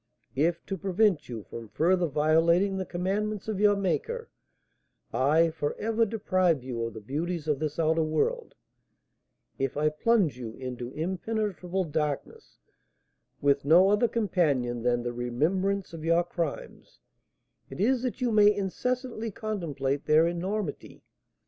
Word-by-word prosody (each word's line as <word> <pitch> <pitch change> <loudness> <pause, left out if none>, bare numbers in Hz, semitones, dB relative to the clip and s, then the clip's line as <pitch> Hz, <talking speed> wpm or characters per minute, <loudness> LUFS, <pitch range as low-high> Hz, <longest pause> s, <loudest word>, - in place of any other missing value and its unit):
If, 165 +5 0
to 195 -2 -4
prevent 190 - +1
you 115 -4 -6
from 115 +2 -9
further 175 - +2
violating 165 +6 +3
the 190 - -4
commandments 200 +4 -2
of 215 -3 -2
your 205 0 +5
Maker, 455 - -2 0.8
I 160 +5 +3
for 150 -2 -3
ever 225 +1 +1
deprive 185 - +1
you 120 -3 -4
of 115 -1 -6
the - - -6
beauties 155 - -3
of 150 -3 +1
this 155 -1 -3
outer 160 0 +2
world, 445 - -1 1.0
if 135 0 -1
I 155 +1 +3
plunge 170 - +1
you 115 -3 -6
into 125 -2 -6
impenetrable 190 +2 -2
darkness, 150 -3 -4 0.8
with 140 0 +2
no 175 +7 +6
other 210 +3 +3
companion 150 - 0
than 120 0 +1
the 120 0 -3
remembrance 170 +12 -1
of 160 -2 -7
your 165 +1 +3
crimes, 170 -3 -5 0.7
it - - -9
is 245 +5 +2
that 255 0 -3
you 245 -2 +1
may 210 -1 +6
incessantly 230 +4 -2
contemplate 160 - -3
their 155 +2 +5
enormity. 175 0 -4
170 Hz, 140 wpm, -28 LUFS, 145-205 Hz, 1.0 s, no